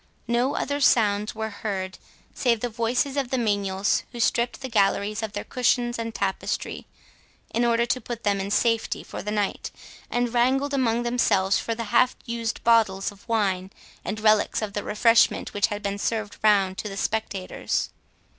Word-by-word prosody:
No 240 +4 +1
other 285 0 -1
sounds 210 -5 +3
were 220 0 -3
heard 190 -3 -4 0.3
save 235 -3 +1
the 245 - -1
voices 240 +5 -1
of 270 -3 0
the 260 - 0
menials 200 -4 +1
who 240 - -8
stripped 235 +2 +1
the 265 - -4
galleries 210 -1 +1
of 220 -2 -4
their 205 - -4
cushions 240 -1 0
and 230 -1 -4
tapestry, 195 -1 -3 0.7
in 235 - +1
order 235 0 +3
to 255 +1 -1
put 235 0 -6
them 200 -2 +1
in 195 - -4
safety 230 +2 +1
for - - -7
the 210 - -5
night, 210 -2 -1 0.4
and 245 -1 -1
wrangled 265 +4 +2
among 240 -3 +1
themselves 200 -5 +2
for 230 - -3
the 230 - -4
half 255 +2 +4
used 235 -2 -3
bottles 215 -5 +3
of 205 +3 -19
wine 195 -4 0 0.3
and 215 - -4
relics 215 0 +3
of 205 -2 -4
the 205 - -3
refreshment 230 +2 +3
which 205 -1 +2
had 205 -2 -5
been 200 0 -2
served 215 -1 -2
round 195 -3 +3
to 210 - -4
the 195 - -7
spectators. 200 -3 -2
220 Hz, 175 wpm, -25 LUFS, 205-240 Hz, 0.7 s, half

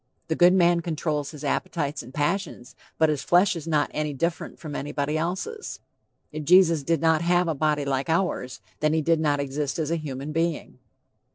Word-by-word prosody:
The 160 - +1
good 175 +2 +6
man 175 -2 +4
controls 155 -3 -2
his 150 -2 -10
appetites 150 0 -2
and 120 - -12
passions, 145 -3 -2 0.2
but 160 -1 +4
his 150 -3 -1
flesh 180 +2 +3
is 165 -1 -7
not 150 -2 +1
any 150 -2 -2
different 170 +4 -3
from 150 -3 -7
anybody 145 +1 -2
else's. 185 - -3 0.5
If 155 0 -5
Jesus 165 -1 +5
did 165 +2 0
not 160 -1 +3
have 175 +1 +2
a 165 - +1
body 150 0 0
like 135 +2 -1
ours, 160 -7 -1 0.2
then 155 0 +1
he 160 -1 +1
did 165 +1 +2
not 145 -2 +1
exist 140 0 -2
as 160 -1 -2
a 170 - +1
human 140 0 -5
being. 165 0 -2
155 Hz, 190 wpm, -25 LUFS, 145-170 Hz, 0.5 s, good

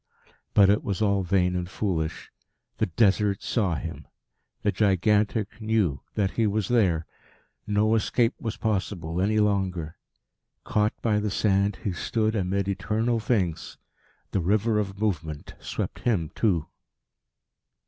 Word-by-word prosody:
But 100 -1 +7
it 105 - +1
was 100 -3 -2
all 100 -2 +2
vain 90 -1 +1
and 90 0 -3
foolish. 85 -6 -3 0.5
The 110 - +2
Desert 100 +1 +2
saw 100 -8 0
him. 70 - -6 0.6
The 105 - +2
Gigantic 105 +2 +1
knew 105 -10 +1
that 100 -3 +1
he 115 -2 +1
was 105 -1 -1
there. 95 -10 +2 0.6
No 105 +1 +2
escape 115 +2 +2
was 110 -2 -4
possible 95 -5 -2
any 110 +3 +2
longer. 95 -6 0 0.7
Caught 105 0 0
by 105 -2 +2
the 105 0 -1
sand, 100 0 +1
he 100 - 0
stood 110 +5 -1
amid 100 0 0
eternal 110 +4 0
things. 95 -8 -1 0.5
The 95 - 0
river 105 +5 +2
of 100 -1 -3
movement 80 -8 -2
swept - - -4
him 95 -10 0
too. 90 -9 +1
100 Hz, 135 wpm, -26 LUFS, 90-110 Hz, 0.7 s, But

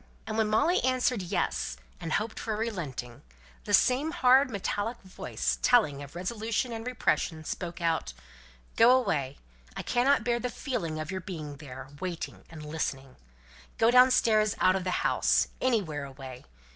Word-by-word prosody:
and 215 - -4
when 220 -1 +2
Molly 320 - +2
answered 255 -3 +1
"Yes," - - -2 0.2
and 165 - -4
hoped 220 +1 -1
for 220 -2 -3
a - - -5
relenting, 155 - -4 0.4
the - - -3
same 265 +5 +2
hard 270 -4 +4
metallic 205 +2 -3
voice, 185 - -3
telling 155 - +3
of 140 +2 -10
resolution 220 +6 -2
and 225 +1 -6
repression, 170 -9 0
spoke 175 +2 -5
out, 165 - 0 0.6
"Go 245 +3 +7
away. 145 - -1 0.4
I - - -4
cannot 250 0 +2
bear 240 0 +1
the 250 - -2
feeling 170 - -3
of 155 +2 -4
your 190 0 -4
being 155 -6 -7
there 135 -2 -9
waiting 175 -1 -5
and 155 -2 -10
listening. 135 -4 -4 0.6
Go 225 +1 +4
downstairs 235 -4 +5
out 185 0 +4
of 190 -1 -2
the 185 - -1
house - - +2
anywhere 185 - 0
away. 130 -2 -10
200 Hz, 160 wpm, -29 LUFS, 155-240 Hz, 0.6 s, Go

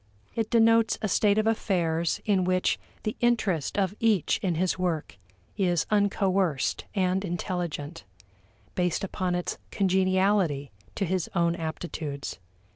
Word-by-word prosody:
It 225 -1 -1
denotes 230 -1 +4
a - - +2
state 205 +1 +3
of 215 - +2
affairs 170 -7 0
in 195 -3 +2
which 185 0 +1 0.2
the 215 - -2
interest 210 -11 +1
of 195 -1 +1
each 215 -8 +2
in 180 -3 0
his 185 +2 0
work 165 - -2 0.4
is 175 -4 +2
uncoerced 195 -6 +1
and 190 0 +1
intelligent: 175 - -4 0.7
based 180 0 0
upon 185 -2 -1
its 175 - -3
congeniality 185 -6 +2 0.2
to 195 - 0
his 185 -1 -1
own 170 -1 +2
aptitudes. 160 - -5
185 Hz, 125 wpm, -27 LUFS, 170-200 Hz, 0.7 s, denotes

